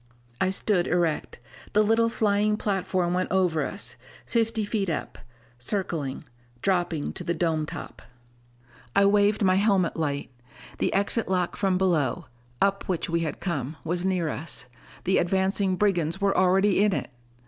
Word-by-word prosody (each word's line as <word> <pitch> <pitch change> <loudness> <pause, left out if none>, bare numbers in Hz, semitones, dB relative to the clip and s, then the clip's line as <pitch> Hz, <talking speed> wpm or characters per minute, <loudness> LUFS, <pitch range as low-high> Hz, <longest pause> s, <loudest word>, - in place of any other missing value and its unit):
I 185 - +3
stood 190 -1 +1
erect. 170 -3 0 0.4
The 210 0 +5
little 225 +2 +3
flying 210 -1 +1
platform 185 -4 0
went 185 0 0
over 180 -4 +2
us, - - -5 0.3
fifty 225 -2 0
feet 205 -3 -1
up, 155 - -4 0.4
circling, 150 - -2 0.4
dropping 175 -5 0
to - - -6
the 170 - -1
dome 160 -2 0
top. - - -8 0.9
I 200 - +5
waved 205 +1 +3
my 185 -1 +4
helmet 195 -4 +2
light. 145 -4 -2 0.5
The - - +1
exit 200 +3 0
lock 180 -2 0
from 190 -2 +1
below 170 -9 +1 0.4
up 195 0 +1
which 175 -2 -1
we 170 - +2
had 160 -3 -3
come 150 -4 -3
was 175 +2 -1
near 185 -3 +1
us. 150 -3 -4 0.4
The 190 - +3
advancing 190 +1 +1
brigands 175 -4 +1
were 200 0 +2
already 190 +2 +4
in 210 -2 +3
it! - - -3
185 Hz, 150 wpm, -26 LUFS, 170-200 Hz, 0.9 s, The